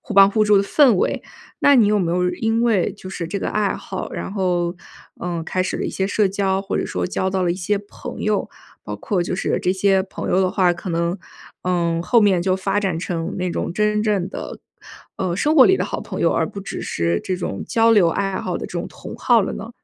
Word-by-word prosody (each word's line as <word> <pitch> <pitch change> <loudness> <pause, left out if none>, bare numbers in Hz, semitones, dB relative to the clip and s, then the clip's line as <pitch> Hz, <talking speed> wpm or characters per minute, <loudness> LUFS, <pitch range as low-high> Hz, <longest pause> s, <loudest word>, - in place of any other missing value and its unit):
互 - - -8
帮 195 0 +8
互 215 +1 +2
助 210 -1 +5
的 195 - +4
氛 265 +2 +5
围， 180 - 0 0.4
那 285 -1 +6
你 230 -4 +6
有 210 0 +3
没 175 -4 0
有 180 +1 +1
因 225 +5 0
为 210 -5 +2
就 195 -2 -10
是 170 -3 -5
这 200 - -3
个 - - -2
爱 210 -2 0
好， 190 - -6
然 - - -5
后， 180 -3 0 0.5
嗯， 170 -2 -3
开 185 +2 -1
始 - - -2
了 - - -3
一 - - -2
些 190 - -1
社 205 +1 +2
交， 195 0 0
或 195 0 -3
者 - - 0
说 90 -1 -2
交 190 0 -1
到 190 -1 0
了 175 -1 +1
一 - - -4
些 195 +3 -1
朋 205 0 -9
友。 215 -1 0 0.4
包 - - -4
括 195 -5 -1
就 175 - -3
是 180 - -1
这 180 - +2
些 190 0 +2
朋 190 - -6
友 190 - +3
的 185 - +1
话， 185 -2 +3
可 180 +1 -6
能， 170 +3 -1 0.4
嗯， 170 -2 0
后 235 +6 +4
面 195 -5 +3
就 185 +1 +2
发 195 +1 -1
展 190 -5 -1
成 165 -1 -3
那 180 -1 -1
种 - - -3
真 210 +2 +1
正 205 -4 0
的， - - -7 0.6
呃， 175 -2 -1
生 300 - +1
活 265 - +9
里 380 - +5
的 - - -1
好 - - -4
朋 - - -6
友， - - +3
而 - - +2
不 200 - -7
只 195 - -6
是 85 0 0
这 185 - -1
种 170 - -4
交 230 0 +3
流 205 -7 +5
爱 195 +2 -1
好 - - -3
的 - - -5
这 - - -12
种 - - -4
同 - - -10
好 240 -2 +4
了 195 - -2
呢？ 225 - -7
190 Hz, 270 characters per minute, -21 LUFS, 180-205 Hz, 0.6 s, 活